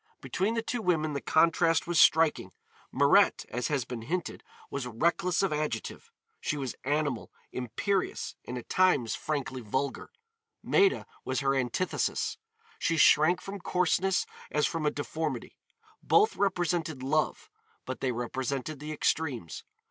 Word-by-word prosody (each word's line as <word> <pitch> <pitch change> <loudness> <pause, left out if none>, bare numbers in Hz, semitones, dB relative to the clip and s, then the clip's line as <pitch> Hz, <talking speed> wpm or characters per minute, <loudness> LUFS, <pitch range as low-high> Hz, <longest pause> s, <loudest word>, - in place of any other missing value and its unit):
Between 200 +5 -1
the 230 - -1
two 240 0 -3
women 155 -6 +1
the 140 - -3
contrast 165 0 +3
was 170 -2 +3
striking. 160 -1 +4 0.4
Mirette, - - +4
as 125 +1 -2
has 140 -5 -1
been 120 -2 -6
hinted, 170 +9 -4 0.3
was 135 -3 -3
reckless 170 - +1
of 195 - +1
adjective; 155 - -3 0.3
she 150 - -2
was 135 -3 -3
animal, 145 -3 -1 0.2
imperious, 180 - -2
and 125 - -6
at 120 - -8
times 180 - +3
frankly 140 -4 -3
vulgar. 130 +5 -3 0.5
Maida 395 -1 +3 0.2
was 130 +2 -1
her 135 0 +2
antithesis. 135 +7 -1 0.4
She 165 - +1
shrank 155 +3 +5
from 195 +1 -7
coarseness 180 +1 +1 0.2
as 150 0 +1
from 160 -3 -1
a - - +5
deformity. 145 -2 -4 0.5
Both 420 +1 +4
represented 175 -7 0
Love, 155 +3 0 0.3
but 130 - -5
they 130 - 0
represented 130 +4 -3
the 150 +1 -6
extremes. 145 - -1
155 Hz, 140 wpm, -29 LUFS, 130-175 Hz, 0.5 s, shrank